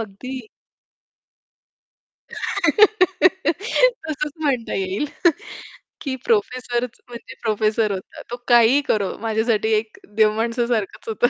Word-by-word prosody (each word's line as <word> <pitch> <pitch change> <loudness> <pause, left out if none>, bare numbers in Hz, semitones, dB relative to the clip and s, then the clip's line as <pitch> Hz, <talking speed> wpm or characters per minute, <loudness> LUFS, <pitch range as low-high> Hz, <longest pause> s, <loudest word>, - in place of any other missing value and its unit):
अगदी. 225 +3 -7 1.8
तसंच 380 - +2
म्हणता 265 -6 -1
येईल 195 +8 -1 0.9
की 270 -3 -3
प्रोफेसरच 250 - -1
म्हणजे 240 -1 -10
प्रोफेसर 215 -1 +1
होता. 190 - -7
तो 240 - -3
काहीही 240 +3 +6
करो. 200 -3 0
माझ्यासाठी 220 0 0
एक 215 0 -7 0.2
देव 215 -1 +5
माणसासारखंच 230 -2 -1
होतं. 225 +2 +2
240 Hz, 90 wpm, -21 LUFS, 220-295 Hz, 1.8 s, काहीही